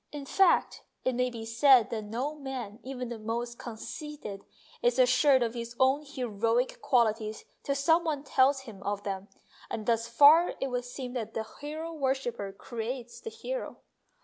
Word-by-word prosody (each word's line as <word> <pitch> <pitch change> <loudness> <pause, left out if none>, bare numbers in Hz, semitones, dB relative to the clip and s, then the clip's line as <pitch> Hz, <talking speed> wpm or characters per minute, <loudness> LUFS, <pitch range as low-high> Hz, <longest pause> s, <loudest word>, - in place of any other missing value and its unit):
In 290 -2 -6
fact, 380 +6 +3 0.2
it 255 - +2
may 250 +1 +1
be 230 -2 -7
said 235 0 +5
that 220 -2 -3
no 245 +8 -3
man, 260 -7 -6
even 255 -2 -5
the 235 -2 -6
most 235 +2 -4
conceited, 235 -2 -7 0.4
is 240 +1 +2
assured 255 +1 +5
of 230 -1 -2
his 235 0 -6
own 265 +3 +4
heroic 245 -3 -1
qualities 220 -3 +1 0.2
till 280 - -1
some 320 +5 +3
one 300 -4 -2
tells 270 0 +3
him 220 -7 -11
of 205 0 -3
them, 195 0 -4 0.4
and 215 - -4
thus 230 0 +1
far 295 +8 +6
it 270 - -2
would 245 0 -2
seem 245 0 -6
that 235 -4 -4
the 225 - -1 0.2
hero 315 +3 -5
worshipper 265 -8 -2
creates 235 +4 -6
the 450 - -5
hero. - - -5
250 Hz, 170 wpm, -29 LUFS, 225-275 Hz, 0.4 s, far